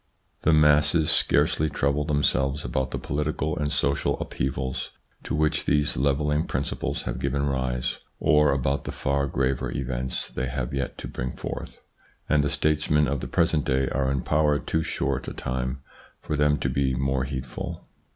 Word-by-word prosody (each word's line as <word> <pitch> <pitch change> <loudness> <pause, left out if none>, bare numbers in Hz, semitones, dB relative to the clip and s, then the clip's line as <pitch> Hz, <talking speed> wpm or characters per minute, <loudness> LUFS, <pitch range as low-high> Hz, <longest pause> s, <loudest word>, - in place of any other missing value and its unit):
The 80 - +3
masses 75 +1 +4
scarcely 80 +1 +3
trouble 70 +1 0
themselves 70 -2 +1
about 65 +2 -1
the - - -3
political 75 +2 -1
and 75 -3 -1
social 70 -1 +1
upheavals 65 0 -3 0.3
to - - -3
which 75 0 +1
these 75 0 +2
levelling 75 +3 +1
principles - - -2
have - - -3
given 70 +1 0
rise 65 -3 -1 0.2
or 75 -1 +4
about 70 +1 0
the - - -3
far 70 0 0
graver 65 -1 0
events 65 -1 -3
they 65 - -2
have 65 +1 -3
yet 70 -2 -2
to - - -6
bring 60 +1 -4
forth, - - -6 0.5
and 75 -1 +3
the 70 - +1
states 75 +1 +1
men 75 -1 +4
of 70 +1 -1
the - - -5
present 80 -3 +2
day 65 -1 +1
are 65 -1 0
in 70 -2 -1
power 75 -1 +3
too 80 +4 -1
short 65 -4 -2
a - - -4
time 65 +1 -3 0.4
for 75 - -3
them 75 0 +3
to 65 - -1
be 65 0 +1
more 65 0 0
heedful. 65 -2 -5
70 Hz, 170 wpm, -26 LUFS, 65-75 Hz, 0.5 s, masses